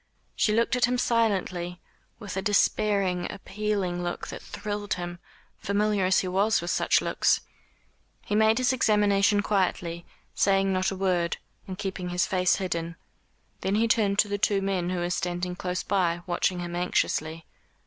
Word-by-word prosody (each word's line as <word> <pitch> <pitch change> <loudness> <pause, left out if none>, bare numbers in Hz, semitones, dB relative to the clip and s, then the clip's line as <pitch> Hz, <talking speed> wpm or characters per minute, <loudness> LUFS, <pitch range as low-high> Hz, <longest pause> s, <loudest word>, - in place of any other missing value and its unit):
She 215 - +2
looked 230 +3 +2
at 250 - +4
him 250 +1 0
silently, 190 -7 0 0.4
with 200 -4 -7
a 190 - -1
despairing 200 -3 +1
appealing 200 -3 -2
look 175 0 -4
that - - -7
thrilled 205 0 -4
him, 175 -1 -6 0.4
familiar 205 -1 +1
as 190 +1 +3
he 185 - -4
was 200 +4 +2
with 175 +1 -3
such - - +2
looks. - - +2 0.8
He - - -3
made 220 +1 +4
his 255 0 +2
examination 205 -3 +3
quietly, 175 -4 -1 0.3
saying 195 -1 +2
not 185 0 +1
a 195 - -4
word, 180 -3 0 0.3
and 185 -1 -6
keeping 190 -3 -4
his 175 0 +1
face 180 -1 +2
hidden. 170 -3 -3 0.6
Then 195 +1 -1
he 225 +2 +2
turned 210 -3 +2
to 210 - +4
the 205 0 -2
two 200 -1 +2
men 190 -3 -1
who 185 - -2
were 175 0 -1
standing 180 0 -2
close 180 0 -3
by, 175 -3 0
watching 180 0 0
him 175 0 -5
anxiously. 165 -2 -1
190 Hz, 165 wpm, -27 LUFS, 180-205 Hz, 0.8 s, at